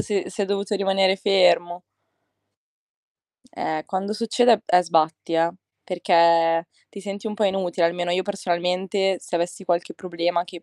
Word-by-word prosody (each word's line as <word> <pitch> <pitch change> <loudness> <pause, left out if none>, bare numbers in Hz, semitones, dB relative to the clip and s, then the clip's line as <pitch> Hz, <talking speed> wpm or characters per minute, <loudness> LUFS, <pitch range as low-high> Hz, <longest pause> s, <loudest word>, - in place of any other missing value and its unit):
si 200 -3 -1
si - - -7
è - - +1
dovuto 200 +1 -2
rimanere 195 -1 +2
fermo. 180 -3 +2 1.7
Eh, 155 -1 -3
quando 195 +2 -3
succede 230 +1 +2
è 180 - +5
sbatti, 165 -1 0
eh, 165 +1 +2 0.3
perché 170 -2 +3 0.2
ti 200 - -11
senti 200 +1 -7
un 215 - -4
po' 210 - 0
inutile, 185 -3 0
almeno 175 +1 -2
io 180 +2 +1
personalmente, 190 0 -1
se - - -8
avessi 175 +3 -4
qualche 175 -1 -1
problema 175 -1 -2
che, 175 -1 -12
180 Hz, 145 wpm, -23 LUFS, 170-195 Hz, 1.7 s, è